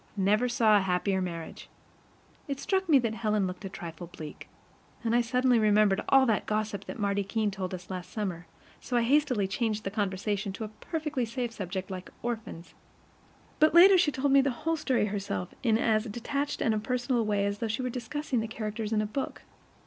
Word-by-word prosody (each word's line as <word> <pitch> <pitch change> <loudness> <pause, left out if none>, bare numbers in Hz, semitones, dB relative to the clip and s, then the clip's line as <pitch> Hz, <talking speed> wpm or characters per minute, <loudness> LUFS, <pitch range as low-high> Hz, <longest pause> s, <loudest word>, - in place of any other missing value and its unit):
"Never 210 +5 +2
saw 220 -3 +4
a - - +3
happier 190 +1 0
marriage." 170 -3 -6 0.8
It 275 -1 -3
struck 380 +1 0
me 295 - +7
that 230 -4 0
Helen 215 -3 0
looked 185 +2 -5
a - - -4
trifle 170 -2 -8
bleak, 155 -3 -9 0.6
and 230 0 0
I 240 - +5
suddenly 250 0 +2
remembered 210 -1 +4
all 270 -1 +6
that 220 -5 0
gossip 215 -1 -2
that - - -7
Marty 200 -1 0
Keene 210 +1 -1
told 190 -2 -4
us 180 +1 -10
last 180 -1 -5
summer; 185 -5 -4 0.3
so 245 - -2
I 235 - +3
hastily 255 -5 +2
changed 215 +1 -1
the 195 - -3
conversation 200 0 -2
to 220 - -6
a 215 - -5
perfectly 300 +3 -3
safe 235 +1 -3
subject 190 -3 -5
like 185 -1 -6
orphans. 220 -8 -5 0.9
But 310 +2 +4
later 380 +3 +9
she 350 -4 +4
told 270 +1 0
me 275 0 +7
the 275 - +1 0.2
whole 325 0 +2
story 260 -8 +1
herself 195 -3 -3
in 225 -3 +3
as 220 -1 +2
detached 280 +6 -3
and 225 - +2
impersonal 245 +3 0
a - - +2
way 205 -2 +1
as 200 0 -2
though 230 - -1
she 220 +4 -2
were 255 - -1
discussing 255 +2 -2
the 220 - -2
characters 215 -1 -4
in 215 -1 +2
a - - -1
book. 240 +6 -4
215 Hz, 200 wpm, -29 LUFS, 200-250 Hz, 0.9 s, later